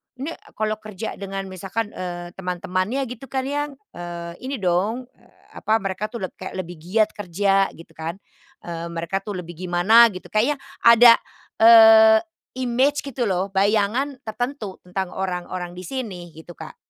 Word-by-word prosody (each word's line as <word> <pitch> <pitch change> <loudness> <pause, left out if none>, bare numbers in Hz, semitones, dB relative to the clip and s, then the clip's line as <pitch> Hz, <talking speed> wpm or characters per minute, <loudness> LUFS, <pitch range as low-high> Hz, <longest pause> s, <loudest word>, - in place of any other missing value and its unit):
ini 280 +6 -5 0.2
kalau 215 0 -1
kerja 215 0 -7
dengan 195 0 -4
misalkan, 200 +4 -4
eee, 175 -1 -6
teman-temannya 185 +7 -2
gitu 250 +2 -8
kan 265 -1 -2
yang, 290 +2 -2 0.2
eee, 170 -1 -7 0.2
ini 275 - -2
dong, 195 +8 0
eee, - - -26 0.2
apa 220 - +1
mereka 195 +2 -3
tuh 230 - -5
leb - - -39
kayak 185 - -7
lebih 175 -1 -10
giat 210 +6 +1
kerja," 195 0 +1
gitu 165 0 -15
kan. 165 +2 -4 0.5
Eee, 170 -1 -5
mereka 170 +3 -2
tuh 205 0 -6
lebih 175 -1 -7
gimana 205 +7 +6
gitu 185 - -9
kayaknya 240 +8 +2 0.3
ada, 235 0 +9 0.4
eee, 220 -1 +9 0.4
imej 260 +4 +1
gitu 265 -3 -3
loh 190 +1 -1
bayangan 210 +8 +1
tertentu 220 -2 -4
tentang 185 0 -3
orang-orang 180 -1 -4
di 180 - -8
sini 185 -8 -6
gitu 170 +2 -11
Kak. 160 - -9
200 Hz, 155 wpm, -22 LUFS, 180-230 Hz, 0.5 s, ada